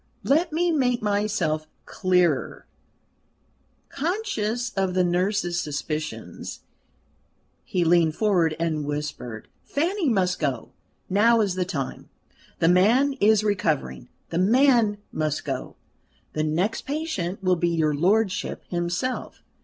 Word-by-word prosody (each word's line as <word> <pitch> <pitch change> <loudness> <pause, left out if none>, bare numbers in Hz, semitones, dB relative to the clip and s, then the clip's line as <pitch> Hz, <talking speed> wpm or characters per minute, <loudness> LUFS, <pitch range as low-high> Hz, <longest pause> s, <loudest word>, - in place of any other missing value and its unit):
"Let 320 +4 +2
me 340 +3 +1
make 250 -7 +1
myself 200 -7 0 0.2
clearer" 180 -6 +1 1.2
conscious 245 - -2
of 190 -3 -1
the 185 - +3
nurse's 175 0 0
suspicions, 150 - -5 1.0
he 180 - 0
leaned 165 -2 +3
forward 175 -7 +2
and 160 -3 -1
whispered: 145 -6 -5 0.2
"Fanny 340 +2 0
must 185 -5 +1
go. 140 -5 -2 0.4
Now 225 +4 +4
is 200 -3 +1
the 185 0 -1
time. 155 -8 -5 0.5
The 165 - +2
man 225 +11 +4
is 215 0 +4
recovering. 155 - -1 0.2
The 165 - 0
man 230 0 +4
must 155 -1 -2
go: 135 -3 -4 0.6
the 155 - -1
next 175 +8 -1
patient 235 - -3
will 185 -1 +3
be 175 0 0
your 160 -3 +1
lordship 190 +6 +1
himself. 175 +8 -3
185 Hz, 115 wpm, -25 LUFS, 160-225 Hz, 1.2 s, Now